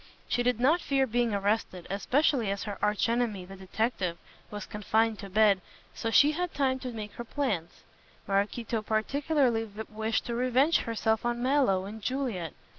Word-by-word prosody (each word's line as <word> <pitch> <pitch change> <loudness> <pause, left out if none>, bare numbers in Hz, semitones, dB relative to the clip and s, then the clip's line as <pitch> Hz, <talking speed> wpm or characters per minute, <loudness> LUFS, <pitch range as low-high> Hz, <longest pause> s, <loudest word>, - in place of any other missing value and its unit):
She 245 - +1
did 245 -1 +1
not 305 +8 +3
fear 270 -1 +2
being 240 -1 +1
arrested, 200 -3 -1
especially 245 +2 +1
as 200 0 -2
her 205 -3 -5
arch 210 +1 +2
enemy, 230 -5 0
the 195 +1 -10
detective, 190 -2 -2 0.3
was 210 0 -6
confined 220 +1 0
to 200 - -7
bed, 205 -1 +4 0.3
so 225 - -3
she 290 +6 +6
had 355 +2 -3
time 265 -2 +1
to 255 -1 -5
make 215 -2 -6
her 240 - -7
plans. 220 - -3 0.4
Maraquito 210 +3 0
particularly 240 +2 +1 0.2
wished 220 +1 -1
to 240 - -3
revenge 255 +6 +3
herself 220 -1 0
on 240 0 -1
Mallow 255 -9 +2
and 215 +2 -8
Juliet. 230 - -2
225 Hz, 165 wpm, -29 LUFS, 205-255 Hz, 0.4 s, she